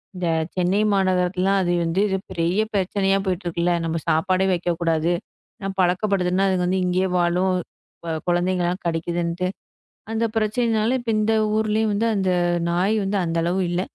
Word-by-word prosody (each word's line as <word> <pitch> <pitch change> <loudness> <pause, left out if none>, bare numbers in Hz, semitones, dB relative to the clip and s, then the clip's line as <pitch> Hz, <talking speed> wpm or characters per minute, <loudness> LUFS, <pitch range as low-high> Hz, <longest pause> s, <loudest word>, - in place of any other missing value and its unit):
இந்த 180 -1 -2 0.3
சென்னை 185 +3 +1
மாநகரத்துலாம் 185 0 +1
அது 175 - 0
வந்து 165 +3 -1
இது 190 -1 0
பெரிய 175 +5 +1
பிரச்சனையா 195 0 +1
போயிட்டுருக்கு 175 -2 -2
இல்ல. 175 0 +2
நம்ம 165 0 -1
சாப்பாடே 185 +4 +2
வைக்கக் 175 -1 -1
கூடாது. 165 0 +1 0.5
நான் 195 0 -4
பழக்கப்படுதுன்னா, 185 0 +1
அதுங்க 185 -2 +1
வந்த 185 - +1
இங்கே 185 +1 +1
வாழும், 180 +2 +2 0.5
வ 165 - -2
குழந்தைங்க 175 +1 +1
எல்லாம் 180 +2 -2
கடிக்குதுன்னு 170 +2 -1 0.6
அந்தப் 225 0 -1
பிரச்சனயினால, 220 0 +1
இப்ப 240 -1 -3
இந்த 215 +1 +1 0.2
ஊர்லயும் 220 0 +1
வந்து 220 +3 0
அந்த 190 -2 +1 0.4
நாய் 180 +5 +1
வந்து 200 +1 0
அந்த 165 0 -2
அளவு 180 +3 0
இல்ல. 175 +1 0
185 Hz, 155 wpm, -22 LUFS, 175-195 Hz, 0.6 s, இல்ல